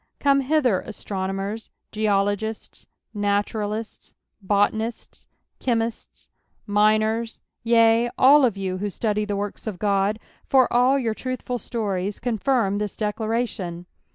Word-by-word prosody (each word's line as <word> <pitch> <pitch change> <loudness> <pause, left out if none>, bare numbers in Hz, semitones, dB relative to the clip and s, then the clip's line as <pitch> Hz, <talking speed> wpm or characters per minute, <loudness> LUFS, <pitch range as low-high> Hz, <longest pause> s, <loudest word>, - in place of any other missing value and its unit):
Come 280 -1 +4
hither, 260 -8 +2
astronomers, 195 +1 -4 0.2
geologists, 210 0 -1 0.3
naturalists, 205 +1 -2 0.3
botanists, 210 +3 -1 0.3
chemists, 230 -2 -3 0.4
miners, 215 +2 +1 0.2
yea, 230 0 +4
all 280 +2 +7
of 230 -6 +2
you 185 -1 -3
who 205 +1 -2
study 210 +1 -1
the 205 -1 -2
works 205 +2 -5
of 205 -4 -4
God, 200 +1 +1 0.3
for 260 -2 +5
all 250 +3 +4
your 235 -5 -1
truthful 255 +1 -4
stories 200 -4 -3
conflmi 230 -3 0
this 210 -2 -4
declara 220 +3 -1
tion. 175 -4 -7
215 Hz, 115 wpm, -23 LUFS, 205-235 Hz, 0.4 s, all